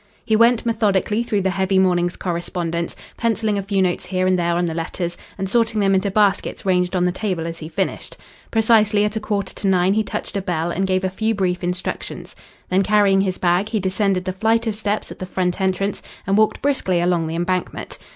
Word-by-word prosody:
He 220 - +2
went 230 +1 +4
methodically 215 -2 +1
through 215 -4 0
the 190 0 +1
heavy 190 +1 +1
morning's 175 -2 +2
correspondence, 170 -1 -3 0.2
pencilling 220 -3 0
a - - -1
few 195 -1 0
notes 180 -1 -1
here 185 0 0
and 185 -1 +2
there 170 0 +1
on 175 +1 +1
the 165 - -2
letters, 170 +1 -3 0.2
and 195 0 -2
sorting 225 +1 +1
them 195 -1 +3
into 190 +1 +2
baskets 200 -1 +1
ranged 180 -1 +1
on 180 - +2
the 180 - +2
table 185 -3 -2
as 165 0 -5
he 155 - -7
finished. 190 +3 -3 0.3
Precisely 215 -2 +3
at 210 +1 -2
a - - 0
quarter 200 -3 -2
to 200 - -3
nine 185 0 +3
he 220 - +2
touched 210 - -5
a 200 - 0
bell, 175 -2 -2
and 190 +3 -1
gave 185 0 +1
a 190 - +1
few 220 +4 0
brief 185 -2 -1
instructions. 180 +1 -4 0.3
Then, 185 +1 +2
carrying 200 -1 +4
his 185 -2 -1
bag, 180 +4 +1
he 220 -1 0
descended 190 -1 0
the 185 - -2
flight 225 +4 +1
of 220 -2 -1
steps 210 0 -2
at - - -10
the 185 - -5
front 180 0 -1
entrance 190 +1 0 0.2
and 195 - +1
walked 215 +3 +2
briskly 265 -11 +1
along 175 -2 +1
the 160 - -4
Embankment. 180 +2 -3
190 Hz, 220 wpm, -21 LUFS, 180-210 Hz, 0.3 s, went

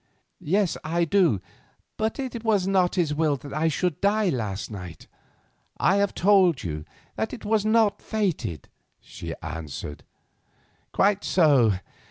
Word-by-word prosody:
"Yes, 190 +3 +1
I 170 +2 0
do, 165 - +3 0.5
but 220 0 -1
it 250 -4 -5
was 210 -5 +2
not 185 -2 +2
His 165 -5 +1
will 150 -2 +1
that 140 +1 -10
I 155 +3 +1
should 165 0 -1
die 205 0 +2
last 110 - -3
night. 90 -5 -8 0.7
I 195 - +3
have 200 0 +1
told 185 - +4
you 75 -4 -4 0.3
that 220 - -2
it 240 - -8
was 215 0 +1
not 220 -2 +3
fated," 160 - -2 0.3
she - - -8
answered. 75 -2 -6 0.9
"Quite 205 0 +2
so. 140 - +4
175 Hz, 140 wpm, -25 LUFS, 125-205 Hz, 0.9 s, told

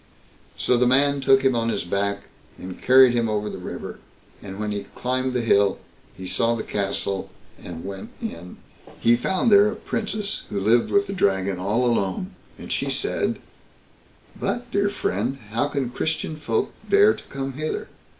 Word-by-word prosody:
So 125 - +2
the 125 +1 +3
man 140 +2 +3
took 135 0 +4
him 130 -2 +3
on 115 0 0
his - - -1
back 100 +3 -1 0.4
and 90 0 -9
carried 130 -1 +7
him 115 -2 +1
over 105 0 -1
the - - -7
river; 90 - -7 0.4
and 95 0 -8
when 105 0 -2
he 100 -1 -4
climbed 130 +1 -1
the 125 - +1
hill, 100 -3 +3 0.4
he 95 - -7
saw 115 +6 +1
the 110 - -4
castle, 100 -1 -2 0.3
and 85 -2 -8
went 95 0 -7
in. 90 +2 -7 0.4
He 120 +1 +5
found 190 - +1
there 205 +1 +7
a - - -6
Princess 215 -1 -3
who 100 - -2
lived 115 +4 +3
with 200 0 +3
the 195 - -5
Dragon 95 - +1
all 105 +7 +1
alone; 115 - 0 0.2
and - - -9
she - - -1
said: - - -1 1.0
"But, 245 0 -3
dear 200 -1 +2
friend, 125 - -2
how 120 +6 +1
can 140 -4 -2
Christian 160 +3 -2
folk 400 - -1 0.2
dare 410 +2 +6
to - - -11
come 135 0 -5
hither? 155 +3 -3
120 Hz, 175 wpm, -24 LUFS, 100-145 Hz, 1.0 s, carried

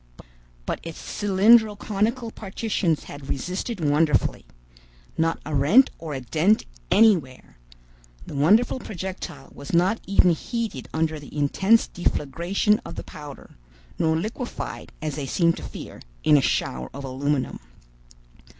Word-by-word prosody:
But - - -2
its 165 -1 -8
cylindro 210 +2 +4
conical 225 +4 -1
partitions 195 -6 -2
had 145 -1 -10
resisted 185 - -3
wonderfully. 150 -3 +2 0.7
Not 165 0 0
a 155 - -5
rent 155 - +5
or 155 -3 -5
a 135 - -4
dent 175 - +2 0.2
anywhere! 175 - +2 0.7
The - - -9
wonderful 205 - +3
projectile 180 - -7
was 140 +3 -9
not 185 +6 +3
even 190 -2 +5
heated 215 - -4
under 160 -1 -1
the 145 +1 -11
intense 190 +10 +3
deflagration 175 +6 0
of - - -8
the - - -6
powder, 145 - -11 0.4
nor 160 -1 +2
liquefied, 225 +8 -5
as 155 -2 -3
they 140 -2 -3
seemed 170 +3 +2
to - - -8
fear, - - -9 0.2
in 150 - +5
a 145 - +5
shower 65 - -1
of 140 - -6
aluminum. 135 +1 -2
165 Hz, 130 wpm, -24 LUFS, 145-210 Hz, 0.7 s, rent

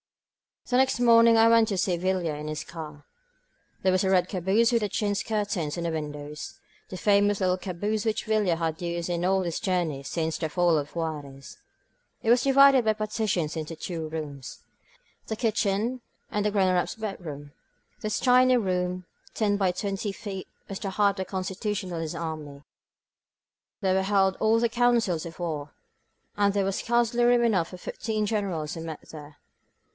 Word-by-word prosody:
The 245 - +2
next 265 -1 +2
morning 230 -1 +6
I 225 0 +6
went 230 -1 +5
to 200 - -2
see 180 -1 +1
Villa 180 -2 0
in 150 +1 -6
his 155 0 -4
car. 155 -3 -9 0.8
This 190 - +4
was 185 +1 +2
a 190 - +1
red 185 -1 +3
caboose 195 +6 +2
with 225 -3 +1
chintz 205 0 -1
curtains 205 -8 -2
on 170 - -3
the 170 - -1
windows, 150 -1 -6 0.3
the 185 - -6
famous 205 +1 +3
little 185 -1 +1
caboose 205 +4 -3
which 220 -1 -1
Villa 215 -5 +2
has 165 0 -3
used 170 0 -3
in 175 0 -1
all 190 0 +2
his 170 -2 -2
journeys 170 -9 -1
since 160 -1 -2
the 160 - -2
fall 175 0 +2
of 145 +1 -4
Juarez. 145 -5 -5 0.7
It 225 - 0
was 245 0 +4
divided 275 -2 +6
by 220 - +3
partitions 215 -7 -1
into 160 +1 -5
two 165 -1 -5
rooms 145 -4 -7 0.3
— - - -35
^the 220 - -2
kitchen 225 +2 0 0.3
and 210 0 -1
the 210 - +2
Gren 195 -2 +2
eraPs 180 +2 0
bedroom. 160 -9 -6 0.5
This 215 - -2
tiny 255 0 +5
room, 180 -3 -1 0.3
ten 205 -2 +1
by 190 -2 +2
twenty 200 +2 -3
feet, 195 -1 -7 0.2
was 195 - -5
the 195 - -4
heart 200 0 +2
of 190 - -2
the - - -23
Constitutionalist 185 -3 -3
army. 155 -4 -6 1.2
There 190 -2 +2
were 190 - +2
held 195 -1 +2
all 220 +1 +3
the 235 0 +2
councils 235 -8 +2
of 165 - -11
war, 155 -4 -4 0.6
and 200 -1 +3
there 200 -1 +1
was 195 0 -1
scarcely 240 0 +1
room 240 0 +4
enough 195 -8 +2
for 180 - -10
the - - -12
fifteen 215 +3 -3
Generals 190 -8 -2
who 165 - -6
met 160 -2 -8
there. 150 -1 -11
190 Hz, 180 wpm, -27 LUFS, 165-215 Hz, 1.2 s, morning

